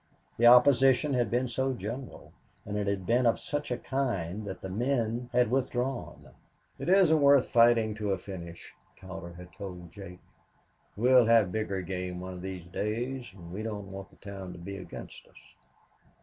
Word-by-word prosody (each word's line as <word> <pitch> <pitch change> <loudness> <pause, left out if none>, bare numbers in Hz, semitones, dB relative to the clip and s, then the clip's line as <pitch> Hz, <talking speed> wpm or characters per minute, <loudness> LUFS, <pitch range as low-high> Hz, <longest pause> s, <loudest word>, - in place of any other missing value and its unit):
The 120 - +5
opposition 130 +2 +6
had 120 -4 +1
been 125 +3 0
so 130 +3 -1
general 130 +2 -7 0.3
and 105 - -5
it 105 -1 -1
had 100 -2 -1
been 120 +3 +3
of 115 - +3
such 145 +1 -3
a 125 - -1
kind 110 -8 -2
that 95 -1 -6
the - - -5
men 120 +3 -1
had 125 -2 +2
withdrawn. 130 -1 -2 0.5
"It - - -3
isn't 180 -5 +5
worth 140 -2 +5
fighting 115 -2 +4
to 105 -1 0
a 95 - +1
finish," 85 -2 -9 0.2
Cowder 95 -2 -9
had 90 0 -12
told 90 -4 -8
Jake. 90 -1 -11 0.8
"We'll 125 +1 +5
have 115 -5 +4
bigger 100 -3 -2
game 90 0 -4
one 95 +1 -6
of 90 - -8
these 95 -2 -6
days, 120 +7 -3
and 85 -3 -11
we 100 - -4
don't 105 -3 -5
want 95 0 -8
the - - -21
town 95 -2 -8
to - - -11
be 100 +3 -7
against 95 - -10
us." - - -22
110 Hz, 180 wpm, -29 LUFS, 95-125 Hz, 0.8 s, opposition